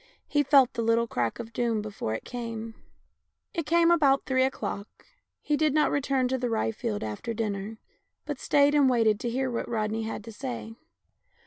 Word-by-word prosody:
He 290 - +2
felt 275 -3 +5
the 235 - -2
little 230 +1 +2
crack 120 - -2
of 230 -1 -8
doom 230 -2 0
before 200 - -4
it - - -7
came. 230 -2 -5 0.8
It 330 -3 -3
came 335 +1 +4
about 280 -5 +4
three 260 -1 +2
o'clock. 210 -6 -4 0.4
He 300 - +1
did 305 -1 +1
not 305 - +3
return 270 -2 +1
to 260 0 0
the 245 -1 -1
rye 225 0 0
field 225 -2 -3
after 110 - -4
dinner, 210 -1 -3 0.5
but 290 -3 -4
stayed 285 0 +3
and 285 -3 +5
waited 225 -4 +3
to 240 - -2
hear 260 +2 -1
what 235 - -3
Rodney 220 -1 -1
had 220 0 -5
to 230 - -9
say. 235 -1 -6
235 Hz, 190 wpm, -27 LUFS, 220-275 Hz, 0.8 s, felt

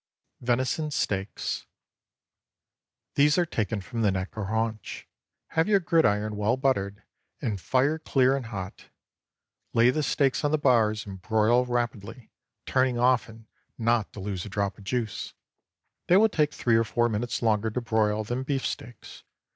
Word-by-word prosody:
VENISON 130 +5 0
STEAKS. 100 -8 -2 1.4
✠ - - -60
These 145 +3 +4
are 175 - +3
taken 110 -8 -2
from 105 +6 -5
the 105 - +3
neck 95 0 -4
or 110 -2 -3
haunch. 110 0 -3 0.4
Have 160 +2 +1
your 205 -2 +4
gridiron 110 - +2
well 105 +4 +1
buttered, 105 -7 -1 0.4
and 105 -5 -3
fire 140 - +1
clear 135 -4 +2
and 130 -4 -4
hot. 95 -5 -7 0.9
Lay 120 +2 +6
the 155 - -1
steaks 135 +1 +1
on 145 - +2
the 155 - +2
bars 115 -6 +2
and 95 -2 -9
broil 110 +5 +2
rapidly, 120 -1 -3 0.3
turning 130 -2 +1
often, 120 -3 +1 0.3
not 115 -2 +1
to - - -9
lose 95 -2 -4
a - - -7
drop 100 0 -2
of 100 - -14
juice. 115 -1 -3 0.7
They 180 - +6
will 220 +2 +5
take 150 -6 +1
three 115 -5 +2
or 115 - +3
four 120 +2 +1
minutes 120 +2 -2
longer 110 -1 +2
to 110 - -2
broil 110 -2 +1
than 120 +4 -3
beef 135 0 -2
steaks. 120 - -7
115 Hz, 160 wpm, -27 LUFS, 105-130 Hz, 1.4 s, Lay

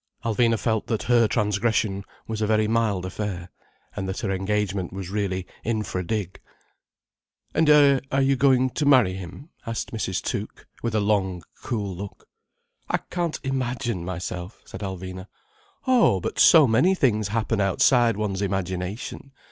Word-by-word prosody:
Alvina 115 0 +2
felt 110 -1 -1
that 110 - -1
her 120 -1 +4
transgression 105 -2 0 0.2
was 110 -1 -4
a 105 - +1
very 110 0 +2
mild 110 -5 0
affair, 95 -2 -5 0.4
and 95 -2 -3
that 95 - -4
her 100 - -1
engagement 95 -1 -1
was 95 -1 -6
really 95 -3 -2 0.2
infra 105 -5 -2
dig. 100 -1 -3 1.1
"And 160 -1 +3
are 145 -3 +6 0.2
you 135 0 +3
going 130 -1 +3
to 150 +2 -1
marry 125 -10 +5
him?" 95 - -9 0.2
asked 115 0 -3
Mrs. 95 -5 -2
Tuke, - - -5 0.2
with 115 -2 -2
a - - +3
long, 95 -4 0 0.2
cool 100 -5 -3
look. 100 +2 -9 0.6
"I - - +2
can't 175 -3 -2
imagine 125 -6 -2
myself—" 90 +1 -6
said 95 - -9
Alvina. 95 -1 -6 0.6
"Oh, 245 - +4
but - - -4
so 160 -3 +8
many 145 +11 +3
things 110 - +1
happen 110 0 -1
outside 115 +3 +3
one's 100 -2 -2
imagination. 95 +6 -4
105 Hz, 150 wpm, -24 LUFS, 95-120 Hz, 1.1 s, so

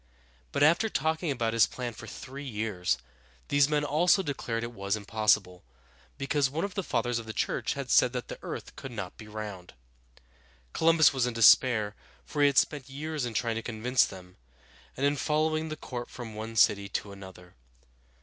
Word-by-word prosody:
But - - +1
after 170 +9 +4
talking 160 0 -1
about 120 -5 -1
his 115 -4 +5
plan 125 -2 -5
for 115 +1 -10
three 135 +6 -8
years, 105 -7 -1 0.5
these 145 0 +4
men 150 -1 +1
also 175 +6 +3
declared 120 -6 -3
it 120 +1 -5
was 100 -1 -1
impossible, 105 -3 +1 0.5
because 135 0 +1
one 160 +7 -2
of 200 - -6
the 195 - -1
fathers 120 -9 -1
of 115 - -9
the 110 - -5
church - - -1
had 140 -3 -4
said 125 - +5
that 125 -2 -4
the - - -8
earth - - -7
could 135 - -8
not 105 -6 -6
be 110 - -12
round. 105 -6 -8 1.0
Columbus 165 -2 +5
was 130 -2 +1
in 120 - -4
despair, 110 -2 +5 0.3
for 145 - -3
he 145 - +7
had 140 -2 0
spent 140 -3 +2
years 150 0 -4
in 120 -2 -5
trying 115 0 0
to - - -2
convince 120 +2 +1
them, 90 -2 -8 0.6
and 135 - 0
in 145 +1 +2
following 155 +2 0
the 155 - -5
court 120 -4 -6
from 120 -3 -8
one 110 +1 -6
city 100 -2 +3
to 100 0 -4
another. 95 -2 -12
120 Hz, 190 wpm, -29 LUFS, 110-145 Hz, 1.0 s, he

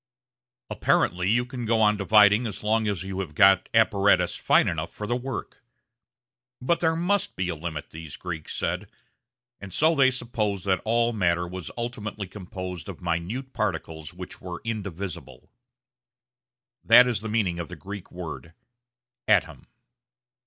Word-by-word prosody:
Apparently 90 +1 +1
you 120 +3 +2
can 125 -1 -6
go 115 0 +2
on 105 -1 +4
dividing 105 +2 +5
as 105 -2 -7
long 110 +1 +1
as 100 -5 -2
you 95 0 -5
have 85 -6 -5
got 95 0 +5
apparatus 100 -3 +3
fine - - +3
enough - - -2
for 105 - -6
the 120 +3 0
work. 125 -1 -6 1.0
But 165 +7 +1
there 160 -1 +2
must 180 +4 0
be 95 -1 -2
a 85 - -2
limit, 80 -1 -6
these 80 -2 -8
Greeks 85 -4 -6
said, - - -2 0.7
and 100 -1 -9
so 160 - +3
they 135 -4 +5
supposed 110 -6 -2
that 95 -2 +1
all 115 +1 +2
matter 85 -4 +1
was 90 -1 -7
ultimately 110 -4 -4
composed 95 -1 -7
of 95 - -8
minute 90 +11 -3
particles 80 -7 -3
which 90 0 -9
were 90 -2 -6
indivisible. 100 -6 -6 1.3
That 120 +2 +8
is 120 -4 0
the 110 - -5
meaning 100 -6 0
of 85 - -4
the - - -8
Greek 100 -1 -9
word 85 -1 -8 0.7
"atom." 80 -9 +1
100 Hz, 150 wpm, -26 LUFS, 90-115 Hz, 1.3 s, That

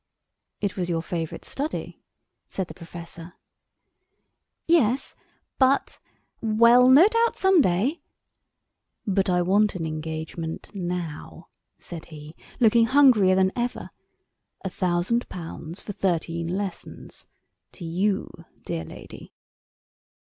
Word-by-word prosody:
"It 200 -2 -1
was 180 -2 -2
your 165 -1 -1
favourite 165 -2 -5
study," 295 +3 -4 0.5
said 190 -2 -3
the - - -9
professor. 170 0 -10 1.3
"Yes—but—well, 250 -4 +1
no 290 +9 +8
doubt 460 +1 +2
some 380 -3 +4
day——" 225 - +1 1.0
"But 195 -1 +1
I 180 -1 +2
want 205 +3 +2
an 165 -3 -3
engagement 160 +2 -5
now," 175 -5 -5 0.3
said 165 -2 -9
he, 155 0 -11 0.2
looking 230 0 +5
hungrier 245 -9 +5
than 190 0 +3
ever; 245 0 -3 0.7
"a 190 - -2
thousand 185 +7 0
pounds 165 0 -8
for - - -6
thirteen 170 -3 -1
lessons—to 185 -1 -8
you, 190 +5 0 0.4
dear 80 - -3
lady." 80 - -12
185 Hz, 100 wpm, -25 LUFS, 170-235 Hz, 1.3 s, no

